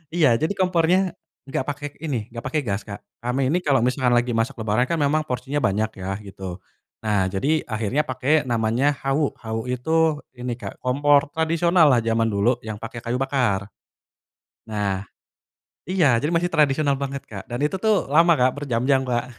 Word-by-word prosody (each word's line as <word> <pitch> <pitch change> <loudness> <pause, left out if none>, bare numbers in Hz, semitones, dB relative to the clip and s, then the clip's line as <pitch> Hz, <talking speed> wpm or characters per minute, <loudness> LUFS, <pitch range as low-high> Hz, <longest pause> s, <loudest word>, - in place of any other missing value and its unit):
iya 140 -9 +4
jadi 160 +5 0
kompornya, 180 0 +2 0.4
gak 130 - -1
pake 145 0 -4
ini, 130 -9 -4
gak 115 0 -7
pake 155 -2 -1
gas 105 -2 -3
Kak 100 -1 -8 0.2
kami 130 +3 0
ini 175 - +2
kalo 140 -8 +2
misalkan 125 -1 +2
lagi 120 +1 +2
masak 115 +4 0
lebaran 110 +2 0
kan 170 - 0
memang 155 0 +1
porsinya 130 +2 -2
banyak 105 -2 0
ya 95 +1 -3
gitu, 95 -2 -8 0.4
nah 105 -3 +1
jadi 140 +12 0
akhirnya 115 +7 -1
pake 130 +3 +1
namanya 120 +5 +1
hawu, 135 +2 0
hawu 110 +1 -5
itu 160 +6 +1 0.2
ini 125 -1 -3
Kak 125 - -9
kompor 140 +3 +3
tradisional 165 0 +3
lah 125 - +4
jaman 115 0 +1
dulu 105 +5 +2
yang 110 -2 -6
pake 115 +1 -7
kayu 120 +1 -2
bakar. 120 -8 0 1.0
Nah 100 -2 -2 0.8
iya 170 -9 +3
jadi 145 +8 0
masih 170 +1 +2
tradisional 145 -3 +2
banget 140 0 -5
Kak 100 -3 -8
dan 120 - -3
itu 150 +5 0
tuh 210 +1 +1
lama 165 +5 +5
Kak 125 +1 +4
berjam-jam 135 -1 +1
Kak, 125 -1 -2
130 Hz, 175 wpm, -23 LUFS, 115-150 Hz, 1.0 s, lama